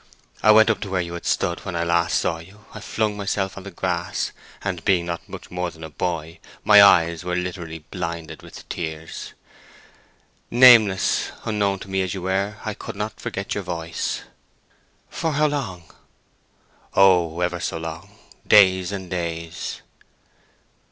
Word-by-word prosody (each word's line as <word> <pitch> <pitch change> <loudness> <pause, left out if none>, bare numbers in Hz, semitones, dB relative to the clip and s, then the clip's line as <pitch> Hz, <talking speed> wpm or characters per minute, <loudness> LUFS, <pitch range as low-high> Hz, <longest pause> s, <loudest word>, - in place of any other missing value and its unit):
I - - +3
went 110 +1 +7
up 110 - -2
to 100 - -5
where 95 -1 0
you 85 -1 -5
had 85 - -6
stood 85 - 0
when 95 -3 -5
I 85 - 0
last 85 0 +2
saw 80 - -1
you—I 105 +5 -13
flung 105 0 -1
myself 100 -1 -2
on 100 - -8
the - - -6
grass, 85 -1 -2 0.3
and—being 90 -1 +1
not 85 -1 -5
much - - -10
more 90 0 -2
than 80 -1 -13
a 80 - -8
boy—my 85 +5 +2
eyes 85 -4 +5
were 90 0 -2
literally 85 -3 -5
blinded 85 -3 -5
with - - -12
tears. 80 -1 -6 1.2
Nameless, 115 -6 +6
unknown 100 -3 0
to - - -8
me 95 0 0
as 95 -1 -2
you 95 - -6
were, 100 +3 -1
I 110 - -2
couldn't 105 +1 -6
forget 95 +1 -4
your 105 - -3
voice." 85 -2 -3 0.9
"For 160 -2 -2
how 150 +1 +2
long?" 120 - -2 1.1
"Oh—ever 90 -2 +3
so 80 - -3
long. 80 0 -8 0.3
Days 95 -3 +5
and 95 -2 -5
days." 85 -2 -4
90 Hz, 150 wpm, -23 LUFS, 85-100 Hz, 1.2 s, went